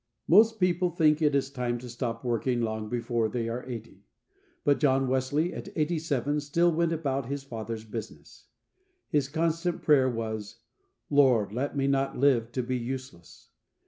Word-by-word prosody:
MOST 220 +5 +5
people 180 -1 +2
think 160 -2 +3
it 150 -2 +3
is 135 -1 0
time 125 -3 -2
to 125 +1 -9
stop 120 -1 -4
working 120 +1 0
long 110 -2 -2
before 120 -1 -1
they 115 -1 -2
are 120 +2 -4
eighty, 115 -4 -8 0.6
but 145 -3 +3
John 135 -2 +3
Wesley 130 +6 0
at - - -7
eighty 160 +1 0
seven 145 -2 -1
still 165 +4 +2
went 170 +1 +1
about 140 -5 -2
his 140 0 -4
"Father's 115 -3 -6
business." 110 0 -9 0.6
His 140 -2 +1
constant 165 +2 -1
prayer 135 -4 +5
was, 110 -2 -5 0.5
"Lord, 125 -8 +4
let 140 +4 -2
me 135 - +1
not 135 0 0
live 125 -4 +3
to 125 - -1
be 125 +1 -2
useless." 125 -8 -8
135 Hz, 165 wpm, -28 LUFS, 115-150 Hz, 0.6 s, MOST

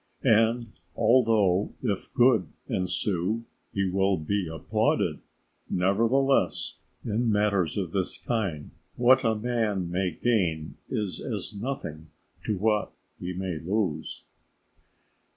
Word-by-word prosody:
And 115 +1 +3 0.2
although 110 -5 +3
if 105 -6 -2
good 120 -8 +4 0.2
ensue 95 +4 -1 0.3
he 100 -1 0
will 95 +1 +2
be 90 +4 -1
applauded, 80 -1 0 0.5
nevertheless 115 +9 +2 0.3
in 115 +1 +1
matters 100 -6 +1
of 90 -5 -2
this 95 -1 -1
kind, 95 -11 -2 0.2
what 130 +2 +5
a 115 -2 +2
man 105 -6 -1
may 90 +1 +1
gain 85 -5 0
is 105 -4 -2
as 110 -4 -4
nothing 100 - -5 0.4
to 105 - 0
what 105 +2 +1 0.3
he 90 - -4
may 90 -3 -3
lose. 95 -1 -2
100 Hz, 110 wpm, -27 LUFS, 90-115 Hz, 0.5 s, what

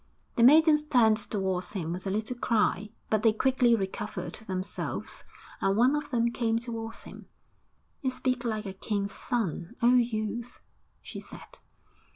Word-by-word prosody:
The - - +1
maidens 300 +4 +7
turned 240 -7 +4
towards 190 -4 -2
him 170 -5 -3
with 185 +2 -5
a - - 0
little 215 +5 -2
cry, 215 -3 +1 0.2
but 215 -1 +3
they 225 0 +5
quickly 250 +1 +3
recovered 200 0 -4
themselves 190 -3 -4 0.4
and 195 +1 +2
one 255 +5 +4
of 295 - -3
them 235 -2 +1
came 230 -2 0
towards 230 -1 -5
him. - - -12 0.7
'You 260 - 0
speak 255 -1 -1
like 220 -2 -2
a 195 - -5
king's 200 0 -3
son, 205 -4 -3
oh 240 +1 +5
youth!' 235 -1 0 0.4
she - - -7
said. - - -12
225 Hz, 155 wpm, -28 LUFS, 200-245 Hz, 0.7 s, maidens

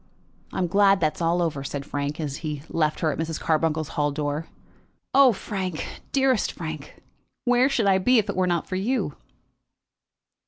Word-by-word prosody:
"I - - -6
am 185 - +1
glad 195 +2 +4
that 155 -1 +2
it - - -18
is - - -8
over," 165 -4 0
said 140 0 -5
Frank, 145 +1 -3
as 145 -3 -3
he 150 -3 -5
left 155 -2 0
her 160 - +2
at - - -5
Mrs. 160 -1 -2
Carbuncle's 155 -1 0
hall 145 -1 0
door. 145 +2 -3 0.7
"Oh, 275 -2 +7
Frank, 190 -5 -5
dearest 265 -5 +2
Frank, 155 -3 -8 0.4
where 245 +2 +4
should 245 -6 +1
I 190 -1 +4
be 250 +7 +4
if 215 -2 +2
it 200 - -3
were 185 0 +2
not 175 -2 0
for 185 - -2
you?" 205 - -1
165 Hz, 185 wpm, -25 LUFS, 155-200 Hz, 0.7 s, Oh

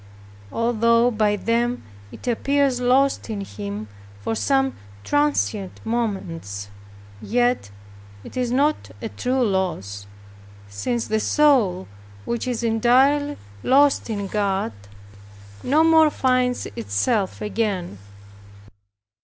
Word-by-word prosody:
Although 230 +1 +2
by 215 -2 +2
them 235 +4 0 0.3
it - - -11
appears 275 +1 +1
lost 265 +1 +2
in 210 -2 -3
Him 100 - -6 0.3
for 100 - -3
some 270 +3 +1 0.3
transient 290 -9 0
moments, 170 - -3 0.5
yet 245 - +1 0.5
it - - -11
is 250 -1 0
not 290 +4 +1
a 225 - -5
true 255 +3 0
loss, 170 - -2 0.6
since 225 - -2
the 220 0 0
soul 235 -10 +3 0.4
which 235 +1 -2
is 240 -2 -2
entirely 260 +6 +3 0.2
lost 280 - +3
in 205 -2 -2
God 195 - -1 0.9
no 300 +5 +3
more 320 -1 +6
finds 255 -3 +1
itself 115 - -1
again. 205 - -2
230 Hz, 105 wpm, -22 LUFS, 195-255 Hz, 0.9 s, more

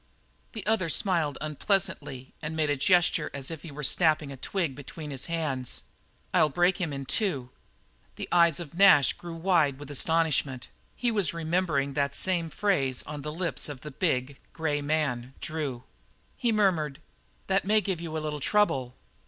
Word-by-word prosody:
The 220 -4 -6
other 210 -5 +1
smiled 160 -5 +1
unpleasantly 155 -4 -2
and 160 +1 -4
made 155 -2 +1
a - - +2
gesture 170 +1 +3
as 135 +2 -5
if 160 - -6
he 165 - -9
were 150 +1 -7
snapping 155 0 +3
a - - -6
twig 165 +2 -2
between 145 +2 -8
his 135 -2 -3
hands. 150 -7 -1 0.5
"I'll 150 - +5
break 175 +5 +2
him 165 -4 -1
in 135 -1 -5
two." 135 - -1 0.6
The - - -5
eyes 170 -3 +5
of 170 -2 -8
Nash 170 -7 +6
grew 170 -1 -8
wide 165 -5 +2
with 145 0 -9
astonishment; 145 -4 +1 0.3
he 240 -1 0
was 195 -8 0
remembering 160 -4 0
that 140 0 0
same 175 -3 0
phrase 140 -11 +1
on 150 -1 -6
the 150 +2 -4
lips 170 -1 -2
of 140 -3 -7
the 150 - -7
big, 135 -3 -1
grey 150 -3 -1
man, 140 -4 -1
Drew. 145 -6 -4 0.5
He 240 -3 +1
murmured: 170 -9 +1 0.5
"That 195 0 +2
may 215 +2 +4
give 190 -4 -3
you 160 -2 -4
a 155 - -3
little 150 -1 -3
trouble. 135 -9 +1
155 Hz, 170 wpm, -28 LUFS, 140-175 Hz, 0.6 s, Nash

